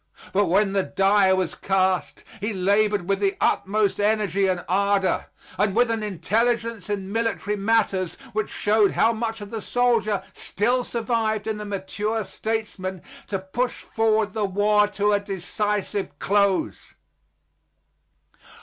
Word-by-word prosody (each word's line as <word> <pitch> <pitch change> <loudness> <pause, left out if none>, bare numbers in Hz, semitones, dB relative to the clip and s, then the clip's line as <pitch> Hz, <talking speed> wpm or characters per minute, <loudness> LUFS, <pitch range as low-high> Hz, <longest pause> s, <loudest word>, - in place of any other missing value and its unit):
But 205 +1 +3
when 195 +3 +2
the 195 - +3
die 195 +1 +3
was 185 -2 +1
cast, 190 -1 0 0.2
he 210 +2 -2
labored 200 0 +1
with 195 0 +1
the 200 -1 0
utmost 205 0 +1
energy 205 -2 +2
and 180 -2 -1
ardor, 200 +1 +1 0.3
and 205 -1 +2
with 240 0 +3
an 225 -1 -1
intelligence 225 +2 -1
in 195 -2 -3
military 225 -2 -1
matters 195 -3 +1 0.2
which 215 0 -1
showed 210 -1 +2
how 230 - +3
much 225 -1 -3
of 205 - -8
the 225 -2 -4
soldier 230 -4 +1
still 245 +5 0
survived 225 -3 -1
in 220 -1 -2
the 210 - -5
mature 205 +2 -2
statesman, 205 -4 -4 0.2
to 195 - -1
push 205 +7 -3
forward 220 -1 +1
the 215 -2 0
war 205 +2 +3
to 205 0 0
a 205 - +3
decisive 200 +1 -3
close. 200 -1 0
205 Hz, 140 wpm, -24 LUFS, 195-220 Hz, 0.3 s, But